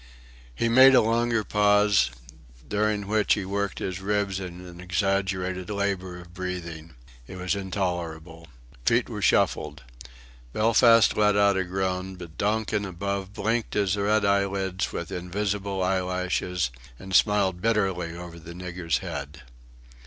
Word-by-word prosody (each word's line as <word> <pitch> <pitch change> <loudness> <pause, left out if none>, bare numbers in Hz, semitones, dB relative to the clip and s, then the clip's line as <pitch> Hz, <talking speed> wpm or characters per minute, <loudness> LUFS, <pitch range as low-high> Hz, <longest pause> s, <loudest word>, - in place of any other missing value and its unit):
He 115 - 0
made 130 +3 +7
a - - +7
longer 115 0 +1
pause, 105 -4 +3 0.6
during 105 0 0
which 105 +1 +2
he 100 - -4
worked 100 +1 -2
his 95 0 -4
ribs 100 -1 -1
in 90 -1 -8
an 85 -1 -11
exaggerated 95 0 -1
labour 100 -3 -2
of 90 -1 -13
breathing. 85 -4 -6 0.3
It - - -9
was 90 -1 -1
intolerable. 85 -4 -4 0.4
Feet - - +2
were - - -5
shuffled. - - +1 0.7
Belfast 115 0 +5
let 105 -1 +3
out 100 -1 +4
a 95 - +1
groan; 95 0 -3
but 85 -3 -11
Donkin 105 0 0
above 100 +1 -4
blinked 115 +3 -1
his 100 -2 +1
red 105 +1 +1
eyelids 100 -1 0
with 85 - -5
invisible 95 +2 -2
eyelashes, 90 -4 -1 0.3
and 95 +6 -9
smiled 95 -2 +3
bitterly 95 -6 0
over 85 -1 -9
the 85 +1 -10
nigger's 90 -3 -2
head. 75 -2 -6
95 Hz, 135 wpm, -26 LUFS, 90-105 Hz, 0.7 s, made